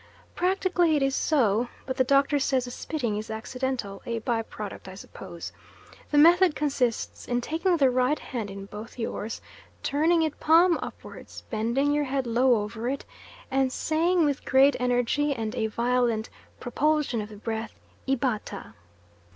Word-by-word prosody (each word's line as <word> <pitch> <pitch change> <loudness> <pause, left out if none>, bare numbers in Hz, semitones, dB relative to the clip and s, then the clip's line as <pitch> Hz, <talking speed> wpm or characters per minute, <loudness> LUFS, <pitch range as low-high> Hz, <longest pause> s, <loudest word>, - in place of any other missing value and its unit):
Practically 360 -3 +2
it 285 - +2
is 270 0 +1
so, 240 -6 +2 0.2
but 260 - -3
the 260 - +3
Doctor 280 +2 +3
says 265 -2 +1
the 245 - -7
spitting 240 -6 -3
is 215 - -6
accidental, 235 -2 -4
a 230 -1 -3
by 230 0 -1
product 210 -3 -8
I 190 - -8
suppose. 170 -3 -9 0.6
The 295 - +1
method 345 +2 +6
consists 265 -6 -1
in 245 0 0
taking 330 +7 0
the 270 -4 +4
right 255 +4 +2
hand 230 -6 -5
in 195 0 -7
both 210 +4 -10
yours, 225 -1 -4 0.4
turning 320 +4 +2
it 310 -2 -2
palm 335 +2 +5
upwards, - - -9
bending 235 +6 +1
your 295 0 +1
head 270 -1 -1
low 235 -1 +3
over 225 +3 -4
it, 275 +1 -4 0.5
and 265 -1 +2
saying 330 +4 +1
with 285 -2 -1
great 270 +1 +5
energy 250 +4 +1
and 220 -2 -3
a 230 -3 0
violent 235 0 0 0.3
propulsion 285 -1 0
of 210 - -7
the 210 - -11
breath, 220 +1 -5 0.3
Ibata. 240 -6 -2
255 Hz, 160 wpm, -26 LUFS, 225-295 Hz, 0.6 s, method